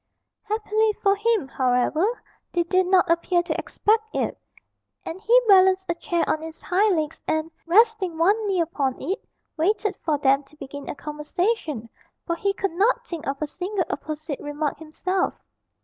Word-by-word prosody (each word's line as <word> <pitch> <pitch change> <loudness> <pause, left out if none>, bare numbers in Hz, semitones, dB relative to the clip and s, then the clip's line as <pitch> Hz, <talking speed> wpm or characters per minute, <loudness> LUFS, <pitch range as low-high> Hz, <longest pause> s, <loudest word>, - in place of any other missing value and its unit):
Happily 430 0 0
for 400 -1 +2
him, 430 -6 +1
however, 270 - +1 0.3
they 345 - +2
did 370 +2 +2
not 370 -1 +4
appear 345 +1 +2
to - - -2
expect 440 +1 +1
it, - - 0 0.7
and 355 +4 -6
he 475 +4 +5
balanced 380 -1 +6
a - - +3
chair 340 0 -1
on 315 - 0
its 320 0 -8
hind 390 +2 +2
legs 310 0 -3
and, 315 +1 -1 0.2
resting 395 -2 +3
one 410 +6 +3
knee 380 -3 +1
upon 280 -6 -1
it, 390 +5 -3 0.3
waited 405 +5 +1
for 310 -3 0
them 275 0 +3
to 290 - -21
begin 280 0 -8
a - - -4
conversation, 300 - -2 0.4
for 335 - -1
he 395 +4 0
could 395 -1 -2
not 405 +8 +2
think 335 -3 -6
of 275 0 -2
a - - +1
single 365 +4 -3
apposite 310 -1 -5
remark 290 0 -3
himself. 365 +4 -2
350 Hz, 165 wpm, -24 LUFS, 305-400 Hz, 0.7 s, balanced